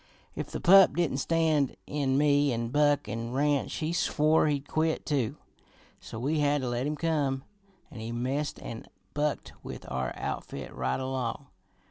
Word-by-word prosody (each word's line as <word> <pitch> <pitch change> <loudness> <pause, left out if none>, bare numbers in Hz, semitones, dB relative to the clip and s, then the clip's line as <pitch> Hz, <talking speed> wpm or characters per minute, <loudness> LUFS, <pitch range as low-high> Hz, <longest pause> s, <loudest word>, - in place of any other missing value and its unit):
If - - -4
the - - -4
pup 190 -3 +7
didn't 165 -6 +1
stand 155 -3 +1
in 140 -2 0
me 145 -1 +4
an' 115 -1 -2
Buck 145 0 +2
an' 115 +3 -4
Ranch, 145 +1 +1
he 160 0 -2
swore 155 -2 +3
he'd 145 -1 -1
quit 160 0 0
too, 135 -7 0 0.6
so - - -9
we 145 +7 0
had 145 -1 +2
to 125 - -2
let 120 +3 -1
him 150 - -1
come, 145 -4 0 0.5
an' 120 - -9
he 110 +1 -5
messed 130 +5 -2
an' 115 - -7 0.3
bunked 150 0 -1
with - - -8
our 65 0 -1
outfit - - -5
right 65 0 -1
along. 130 0 -3
145 Hz, 165 wpm, -29 LUFS, 125-150 Hz, 0.6 s, pup